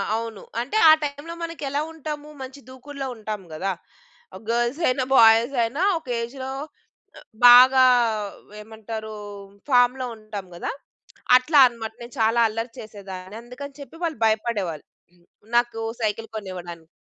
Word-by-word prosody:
అవును. 225 -2 -5 0.2
అంటే 270 - -2
ఆ - - +10
టైంలో 290 +3 -5
మనకెలా 290 -4 -3
ఉంటాము? 300 -1 -7
మంచి 265 +2 -8
దూకుడులో 270 +1 -7
ఉంటాము 215 -3 -6
గదా! 190 +5 -2 0.8
గర్ల్స్ 240 +5 0
అయినా, 255 +1 +1
బాయ్స్ 230 +3 +6
అయినా 240 +8 -3 0.2
ఒక 315 - -26
ఏజ్‌లో 260 +3 -6 1.0
బాగా 255 +2 +8 0.8
ఏమంటారు 220 0 -8 0.6
ఫార్మ్‌లో 250 0 +3
ఉంటాం 215 -3 -8
గదా! 175 - -4 0.7
అట్లా 285 +4 +3
అన్నమాట. 225 -2 -7
నేను 235 +1 -10
చాలా 225 +2 +3
అల్లరి 225 +2 -4
చేసేదాన్ని. 195 -2 -9
అందుకని 270 +4 -10
చెప్పి 280 - -12
వాళ్ళు 320 -7 -2
భయపడేవాళ్ళు. 215 -8 -1 0.7
నాకు 240 -1 0 0.2
సైకిల్ 220 +1 -2
కొనివ్వడానికి. 175 -5 -8
235 Hz, 120 wpm, -23 LUFS, 215-265 Hz, 1.0 s, ఆ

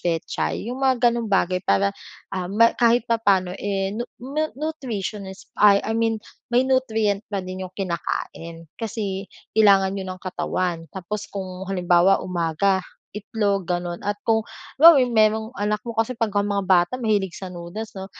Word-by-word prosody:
pechay, 165 -2 -2
'yong 255 - -5
mga 255 -3 +3
ganong 235 -1 -2
bagay 185 -2 +2
para, 100 0 +3 0.4
ah, 185 -2 -2
ma 230 +3 +5
kahit 235 0 +4
papa'no, 200 -5 +2
eh, 195 -1 -1
nu 240 +1 -3 0.2
nu-nutritionist, 260 - -4
ah, 205 -1 +7
I 220 - -2
mean 225 -1 0 0.3
may 245 +2 +5
nutrient 225 -6 +1
pa 200 -2 -3
din 185 0 -6
'yong 185 - -17
kinakain, 170 -3 -4
kasi 200 -3 -3 0.3
kailangan 195 -2 +5
'yon 185 -1 -5
ng 185 - -18
katawan. 180 -2 -2
Tapos 205 +3 -5
kung 190 -1 -6
halimbawa 180 0 +3
umaga, 180 +2 +1 0.4
itlog 205 -3 -1
gano'n 175 -1 -2
at 205 - +1
kung 220 -1 +2 0.3
halimbawa 280 -5 +8
merong 220 0 +3
anak 210 0 0
mo 230 -1 -6
kasi 225 +3 0
pagka 210 -4 0
mga 200 -1 -1
bata 175 +4 +4
mahilig 205 -5 +1
sa 190 -1 -7
noodles 180 +5 -7
'no, 190 - -6
200 Hz, 155 wpm, -23 LUFS, 185-225 Hz, 0.4 s, halimbawa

